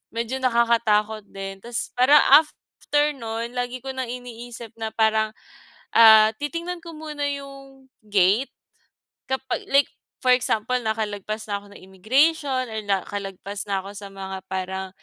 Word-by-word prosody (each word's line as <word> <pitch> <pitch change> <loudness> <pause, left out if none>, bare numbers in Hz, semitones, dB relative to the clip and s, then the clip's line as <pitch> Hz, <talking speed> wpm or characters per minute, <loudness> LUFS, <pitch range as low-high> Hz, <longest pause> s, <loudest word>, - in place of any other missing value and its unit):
medyo 235 +3 -2
nakakatakot 230 -4 +2
din. 195 -1 -7
Tapos 235 +4 -4
parang 270 +4 +7 0.2
after 300 -1 -1
no'n, 230 0 -4
lagi 245 0 -3
ko 270 - -7
ng 260 -1 -3
iniisip 240 -2 -8
na 220 -1 -4
parang, 220 -1 +2 0.6
ah, 220 -1 +9
titingnan 335 +4 -4
ko 335 - -7
muna 305 -2 -5
yung 275 -1 -9 0.2
gate 205 +5 +2 0.8
kapag 265 -1 -2
like 280 +1 +5 0.4
for 255 -1 +5
example 250 0 +1
nakalagpas 215 -1 -3
na 200 0 -1
ako - - -17
ng - - -14
immigration 260 - +1
or 220 -1 -4
nakalagpas 200 0 -3
na 195 -1 0
ako 200 - -8
sa 200 -1 -8
mga 190 -1 -7
parang 190 0 -4
230 Hz, 140 wpm, -23 LUFS, 205-265 Hz, 0.8 s, ah